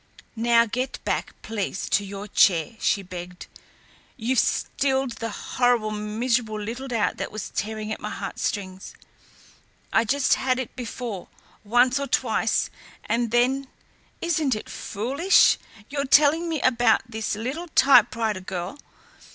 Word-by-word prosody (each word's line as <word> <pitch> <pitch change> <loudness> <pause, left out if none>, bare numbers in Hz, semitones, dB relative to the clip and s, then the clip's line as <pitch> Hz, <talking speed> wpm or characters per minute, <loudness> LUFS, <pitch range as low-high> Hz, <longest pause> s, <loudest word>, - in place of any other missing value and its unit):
"Now 235 0 +4
get 250 +4 -3
back, - - -3
please, 205 -3 -3
to 205 - +2
your 200 +1 -7
chair," 185 -1 +3
she 200 - +1
begged. 180 -1 -8 0.7
"You've 245 +1 +1
stilled 265 -2 0
the 230 - -3
horrible, 240 0 0
miserable 215 +1 -1
little 235 +6 -5
doubt 230 -4 0
that - - -4
was 215 -2 -6
tearing 215 0 -3
at - - -3
my - - -5
heartstrings. 190 -2 -4 1.0
I 225 - +4
just 275 +4 +2
had 255 -1 +1
it 260 -3 -5
before, 235 -5 -5 0.4
once 245 +5 +3
or 280 - -3
twice, - - +1 0.3
and 235 0 0
then 255 +4 +2 0.5
isn't 310 -7 +1
it 215 - -7
foolish! 270 - +3 0.3
your 280 0 -2
telling 305 +5 +4
me 320 -2 -1
about 240 -3 +3
this 220 -2 -3
little 265 +11 -4
typewriter 230 - +4
girl! 185 +8 -5
235 Hz, 135 wpm, -24 LUFS, 210-260 Hz, 1.0 s, Now